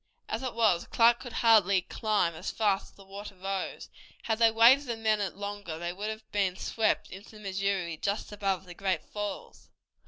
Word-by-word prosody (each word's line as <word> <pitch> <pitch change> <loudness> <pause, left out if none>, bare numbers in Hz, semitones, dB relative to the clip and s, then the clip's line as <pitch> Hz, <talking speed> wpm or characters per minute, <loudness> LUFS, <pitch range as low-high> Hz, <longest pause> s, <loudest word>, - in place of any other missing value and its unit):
As - - -3
it 255 -3 -4
was, 215 -7 +2
Clark 235 +1 +4
could 245 - -8
hardly 200 -5 +5
climb 210 -6 0
as 160 - -5
fast 205 -3 +1
as - - -28
the 195 - -16
water 200 +1 -9
rose. 195 0 -4 0.4
Had 220 -1 -1
they 230 -1 +6
waited 240 +5 +5
a 235 - -2
minute 215 -4 0
longer 200 -5 -5
they 175 +1 -4
would 205 +4 -4
have 220 0 -7
been 195 -3 +1
swept 220 +3 0
into 195 +4 -10
the - - -11
Missouri 195 -4 -2
just 200 +6 -2
above 195 -3 -2
the 180 - -10
Great 185 -3 -1
Falls. 205 -1 -6
200 Hz, 190 wpm, -29 LUFS, 190-220 Hz, 0.4 s, they